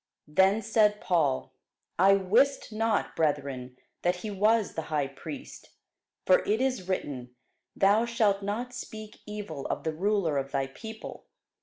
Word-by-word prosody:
Then 190 +7 +3
said 210 -1 +3
Paul, 160 -8 +1 0.5
I 195 +2 +7
wist 225 +9 +2
not, 225 0 0
brethren, 140 -5 -1 0.2
that 175 +1 +2
he 210 +4 -6
was 210 +1 +2
the 160 - -2
high 150 -3 +1
priest: 140 +2 -9 0.5
for 185 - +6
it 215 +2 0
is 255 -8 -1
written, 130 -9 -3 0.4
Thou 205 +4 +4
shalt 215 -4 +2
not 225 +5 -3
speak 215 -3 -8
evil 205 -9 -5
of - - -3
the 160 - -1
ruler 180 -4 +1
of 135 0 -5
thy 135 -1 0
people. 220 +11 -9
195 Hz, 145 wpm, -28 LUFS, 150-215 Hz, 0.5 s, I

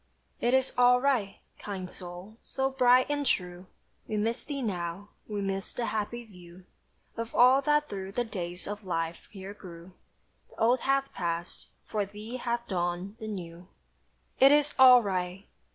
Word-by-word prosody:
"It 240 +2 +2
is 265 0 +1
all 250 0 +6
right." 250 -7 0 0.2
Kind 190 -3 -6
soul, 180 +4 -9
so 270 0 -2
bright 255 -1 +5
and 290 0 -1
true, 180 -7 -1 0.4
We 215 - -2
miss 225 +3 -1
thee 280 -2 -4
now, 180 -1 -4 0.2
we 210 -1 -3
miss 195 -1 -2
the 240 - -2
happy 220 +2 -3
view 180 -3 -15 0.5
Of 230 0 -5
all 255 +3 +6
that 295 +1 +2
through 195 -1 -6
the 245 - 0
days 180 -5 -6
of 205 +1 -5
life 165 -2 -3
here 195 -1 -9
grew. 175 -3 -12 0.6
The - - -19
old 240 +3 +4
hath 275 0 0
passed 170 0 -4 0.2
for 210 -1 -1
thee 210 +5 -7
hath 235 -1 -3
dawned 180 +2 -2
the 220 - -6
new. 175 -4 -7 0.7
"It 270 +1 +8
is 295 0 +3
all 250 -2 +9
right!" 185 0 -3
210 Hz, 165 wpm, -29 LUFS, 180-250 Hz, 0.7 s, all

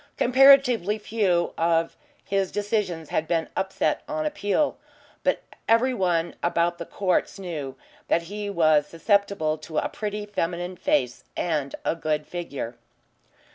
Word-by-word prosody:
Comparatively 255 -5 +5
few 200 -5 0
of 165 0 +2 0.3
his 195 -1 0
decisions 200 -7 -2
had 160 - -1
been 165 -2 0
upset 190 0 0
on 310 0 -2
appeal. 295 -1 0 0.4
But - - +1 0.3
every 235 +3 +4
one 175 -6 0
about 170 0 +1
the 170 - -6
courts 190 0 0
knew 155 -8 -5 0.3
that 170 - +2
he 205 +4 -5
was 155 -5 +3
susceptible 165 -3 +1
to 155 0 -7
a - - +1
pretty 210 -1 -4
feminine 175 -2 -3
face 125 -8 0
and 150 -5 -1
a - - +1
good 155 -2 -1
figure. 140 -9 -5
175 Hz, 135 wpm, -25 LUFS, 165-210 Hz, 0.4 s, Comparatively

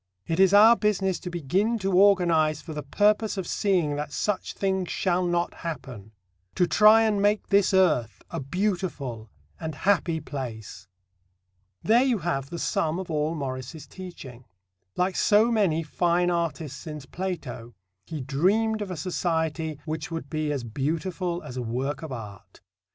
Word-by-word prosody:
It 165 +2 -2
is 190 -1 +6
our 215 +3 +8
business 195 -4 0
to 180 - -6
begin 180 - 0
to 195 -2 -2
organize 170 -6 +4
for 155 - -8
the 150 - -4
purpose 210 +8 +1
of 190 - -2
seeing 175 -7 0
that 150 0 -4
such 205 +3 -2
things 190 -2 -1
shall 180 -1 0
not 175 0 0
happen; 130 - -7 0.4
to 180 - +3
try 215 +4 +6
and 210 -2 +1
make 205 +1 +1
this 200 -1 +4
earth 150 - +2
a - - -3
beautiful 140 - -3 0.3
and 160 -2 -5
happy 170 0 +1
place. 110 -9 -7 1.0
There 230 +3 +5
you 255 -4 +2
have 140 -7 -2
the 170 - -5
sum 160 0 0
of 185 -2 -5
all 155 +1 0
Morris's 135 +1 -5
teaching. 135 -10 -10 0.5
Like 180 +1 0
so 215 +3 +4
many 185 -8 +2
fine 175 +2 +1
artists 165 -4 -2
since 150 -4 -8
Plato, 150 -10 -6 0.3
he 155 -3 -5
dreamed 200 - +1
of 205 - -4
a 180 - -5
society 160 -2 -2
which 155 0 -4
would 165 -4 -6
be 155 -1 -1
as 140 -4 -2
beautiful 165 - -2
as 125 - -8
a - - -1
work 130 +5 -3
of 160 -3 -7
art. 105 -6 -9
170 Hz, 160 wpm, -26 LUFS, 145-190 Hz, 1.0 s, our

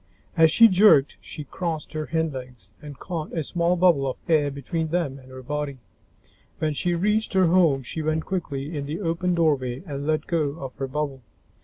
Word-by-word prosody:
As 160 -2 +6
she 230 +8 +7
jerked, 185 -8 +5
she 150 - -7
crossed 160 0 -5
her 155 -1 -3
hindlegs 135 -7 -4
and 145 -2 -9
caught 165 -4 -5
a 160 - -1
small 170 +3 +1
bubble 170 -6 +3
of 130 - -5
air 155 -3 +3
between 160 +4 -3
them 155 -5 -2
and 130 0 -16
her 130 0 -10
body. 145 0 -3 0.8
When 155 -1 -1
she 175 +4 -1
reached 210 +5 0
her 190 -1 +4
home, 165 -6 +3
she 160 +6 -5
went 155 +1 -1
quickly 155 -5 -4
in 140 -1 -4
the 155 +5 -4
open 175 -1 -1
doorway 140 -5 0
and 140 -3 -5
let 155 0 0
go 155 -3 -1
of 135 -3 -6
her 135 - -3
bubble. 140 -1 -3
155 Hz, 190 wpm, -24 LUFS, 140-170 Hz, 0.8 s, she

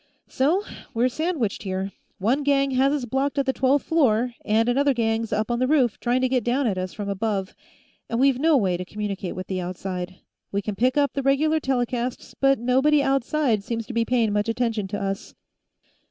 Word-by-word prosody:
"So 320 +10 +1 0.3
we're 240 +3 +3
sandwiched, 300 - -2
here; 190 0 -3 0.3
one 230 +9 +1
gang 275 -1 +2
has 265 +1 +3
us 285 -4 -1
blocked 270 +4 -1
at 275 - +2
the 265 - +1
twelfth 265 +2 +2
floor, 250 -7 +2
and 220 +2 +2
another 275 +2 +2
gang's 225 -1 0
up 215 +2 0
on 240 - 0
the 255 - +2
roof, 260 -6 +2
trying 245 +1 +1
to 260 - +3
get 250 -2 0
down 255 +4 +1
at 210 -5 +1
us 185 0 -3
from 205 -1 -6
above, 200 -1 -2 0.6
and 230 - -1
we've 270 -1 +3
no 315 0 +4
way 185 -7 +1
to 180 - -4
communicate 200 -1 -4
with 185 - -5
the 185 -1 -3
outside. 180 0 -5 0.4
We 200 0 -1
can 210 - -3
pick 255 +6 +1
up 285 -1 +2
the 275 - -1
regular 295 +4 +2
telecasts, 250 -2 -2
but 275 0 +4
nobody 265 +5 +3
outside 270 -4 +1
seems 230 +1 -3
to 245 - -7
be 230 0 +2
paying 230 -3 +1
much 210 +2 0
attention 225 -3 -1
to 205 +2 -4
us." 195 0 -4
240 Hz, 205 wpm, -24 LUFS, 210-275 Hz, 0.6 s, no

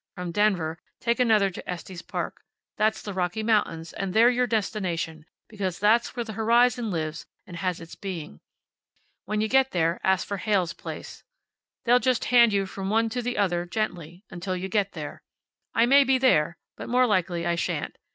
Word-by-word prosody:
From 180 -2 -5
Denver 175 -5 +1 0.2
take 235 0 0
another 215 -5 +4
to - - -9
Estes 180 0 -6
Park. - - -5 0.3
That's 215 0 +1
the 205 - -5
Rocky 185 +3 -1
Mountains, 185 -7 0
and 195 0 -4
they're 235 +3 +6
your 250 0 +1
destination, 180 -8 -2 0.2
because 195 -5 -3
that's 220 +5 +2
where 240 - -2
the 220 -2 -7
horizon 235 +2 +3
lives 160 -3 -3 0.2
and 175 - -9
has 185 -1 -2
its 165 -1 -11
being. 170 - -7 0.9
When 210 +1 -1
you 220 - +1
get 265 +3 +3
there 165 -1 +1
ask 190 -1 +2
for 200 - -3
Heyl's 190 -4 0
place. - - -8 0.6
They'll 245 +1 +5
just 255 -1 +1
hand 235 -2 +7
you 200 -1 +1
from 190 0 -5
one 225 +2 +2
to 245 +2 -2
the 245 +1 -3
other, 175 -3 0
gently, 180 -2 -4
until 185 +1 -4
you 190 +1 -4
get 200 -1 0
there. 150 -3 -7 0.5
I 230 - +5
may 280 +3 +6
be 265 0 +3
there, 170 -11 +3 0.2
but - - -8
more 250 +1 +4
likely 180 -6 0
I 170 - +1
shan't. 170 - -2
200 Hz, 185 wpm, -26 LUFS, 175-230 Hz, 0.9 s, hand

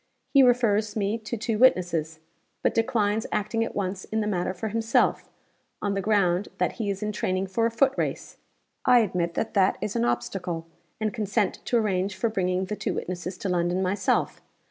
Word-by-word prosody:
He 275 - +7
refers 230 -4 +3
me 210 +1 0
to 220 +2 -5
two 220 0 -2
witnesses; 175 -10 +3 0.5
but - - +2
declines 225 -2 +1
acting 215 +2 0
at 230 - -5
once 190 -1 -2
in 220 - -2
the 215 - 0
matter 185 -3 -1
for 190 +4 -4
himself, 225 +2 +1 0.5
on 205 -1 -1
the 195 - -1
ground 195 -2 +2
that - - +1
he 220 -4 -3
is 200 +1 -3
in 210 - -1
training 185 -2 -1
for 225 +5 +1
a - - -1
foot 265 +4 +2
race. - - -3 0.5
I 250 -1 +6
admit 175 -5 -1
that - - -2
that 195 -3 +3
is 210 - -3
an 115 - +1
obstacle, 165 +8 -2 0.3
and 215 -1 -1
consent 210 -2 0
to 240 - +2
arrange 195 -3 0
for 205 +5 0
bringing 185 -3 0
the 210 - -4
two - - -3
witnesses 180 +1 -4
to 195 - -3
London 175 +1 +1
myself. 190 0 0
205 Hz, 190 wpm, -26 LUFS, 185-220 Hz, 0.5 s, He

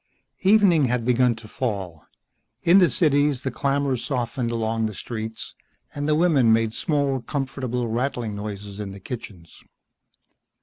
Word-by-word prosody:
Evening 195 -6 +5
had 125 -2 -1
begun 125 -1 +3
to 110 -1 -12
fall. 100 - -4 0.6
In 175 +3 +6
the 180 -4 +5
cities 145 0 +2
the 135 - -2
clamor 140 -1 0
softened 120 -1 -2
along 115 -1 -1
the 105 - -7
streets, 110 0 -6 0.4
and 145 +1 -3
the 150 - +4
women 150 -8 +4
made 110 -1 +2
small, 140 -4 0
comfortable, 130 -2 -3
rattling 120 -1 -2
noises 100 -1 -6
in 100 -2 -5
the 100 - -10
kitchens. 95 -6 -9
125 Hz, 140 wpm, -24 LUFS, 110-140 Hz, 0.6 s, In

